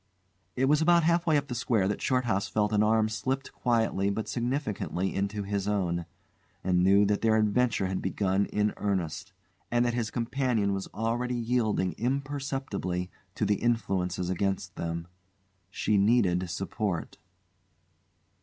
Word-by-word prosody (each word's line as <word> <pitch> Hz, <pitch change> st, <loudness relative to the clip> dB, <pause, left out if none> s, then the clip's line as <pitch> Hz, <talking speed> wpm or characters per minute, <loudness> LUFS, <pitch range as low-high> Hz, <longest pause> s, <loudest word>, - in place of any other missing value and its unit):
It 130 Hz, -, +2 dB
was 150 Hz, +3 st, +3 dB
about 170 Hz, +1 st, +5 dB
half 170 Hz, +1 st, +2 dB
way 155 Hz, -2 st, +4 dB
up 140 Hz, -, -1 dB
the 125 Hz, -, -4 dB
square 115 Hz, -5 st, +1 dB
that 100 Hz, -, -2 dB
Shorthouse 115 Hz, -7 st, +1 dB
felt 105 Hz, 0 st, 0 dB
an 105 Hz, -, +3 dB
arm 110 Hz, 0 st, +3 dB
slipped 130 Hz, +6 st, -3 dB
quietly 115 Hz, -5 st, +1 dB
but 105 Hz, +1 st, -2 dB
significantly 120 Hz, -7 st, -2 dB
into 100 Hz, +1 st, -2 dB
his 100 Hz, 0 st, -2 dB
own, 90 Hz, -4 st, -1 dB, 0.6 s
and 90 Hz, -1 st, +2 dB
knew 100 Hz, +2 st, +5 dB
then -, -, +4 dB
that 105 Hz, -, +1 dB
their 110 Hz, -1 st, +3 dB
adventure 110 Hz, 0 st, +2 dB
had 95 Hz, 0 st, -2 dB
begun 95 Hz, +1 st, 0 dB
in 105 Hz, 0 st, 0 dB
earnest, 95 Hz, -6 st, -2 dB, 0.4 s
and 120 Hz, 0 st, +2 dB
that 120 Hz, -, +1 dB
his 115 Hz, -2 st, -1 dB
companion 115 Hz, -4 st, 0 dB
was 95 Hz, 0 st, -3 dB
already 120 Hz, +3 st, -2 dB
yielding 115 Hz, -6 st, 0 dB
imperceptibly 135 Hz, -9 st, -2 dB, 0.2 s
to -, -, 0 dB
the 105 Hz, -, +1 dB
influences 95 Hz, -6 st, 0 dB
against 95 Hz, 0 st, -2 dB
them. 85 Hz, 0 st, -3 dB, 0.6 s
She 105 Hz, +2 st, +1 dB
needed 95 Hz, -5 st, +3 dB
support. 95 Hz, 0 st, -3 dB
105 Hz, 150 wpm, -28 LUFS, 95-120 Hz, 0.6 s, about